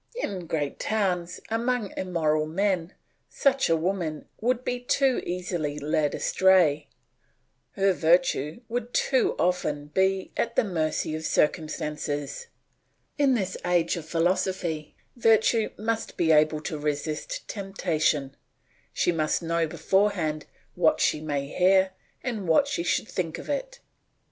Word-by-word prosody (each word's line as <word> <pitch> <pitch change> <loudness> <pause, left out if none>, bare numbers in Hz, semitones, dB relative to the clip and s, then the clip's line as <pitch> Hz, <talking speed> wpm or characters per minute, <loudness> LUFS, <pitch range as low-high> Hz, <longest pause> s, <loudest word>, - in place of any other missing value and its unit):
In 190 - -4
great 145 -3 -2
towns, 180 -5 -1
among 230 -2 -1
immoral 155 -4 0
men, 185 +1 -1 0.3
such 270 -5 +2
a 165 - +4
woman 165 -3 -2
would 250 +2 0
be 245 - -1
too 260 +1 +1
easily 175 -4 -2
led 150 0 0
astray; 170 -6 +3 0.9
her 195 0 +2
virtue 165 - +2
would 240 +1 -4
too 260 -2 +2
often 150 -5 0
be 190 0 +1
at 235 0 -1
the - - +4
mercy 160 -5 -1
of 155 - -5
circumstances; 150 - -1 0.7
in 275 -3 +4
this 190 -5 -2
age 175 -2 +2
of 165 -2 -7
philosophy, 170 -2 -1 0.2
virtue 225 -1 +3
must 225 +2 -3
be 165 -2 +3
able 155 0 +4
to 155 0 -4
resist 150 - -3
temptation; 160 -8 -1 0.6
she - - +1
must 155 0 0
know 165 0 0
beforehand 175 -4 0 0.3
what - - +3
she 150 - +2
may 145 -3 -2
hear 190 +4 +3 0.3
and 220 -7 -3
what 165 - +4
she 280 +4 -2
should - - 0
think - - -3
of - - -9
it. - - -4
180 Hz, 130 wpm, -26 LUFS, 155-210 Hz, 0.9 s, a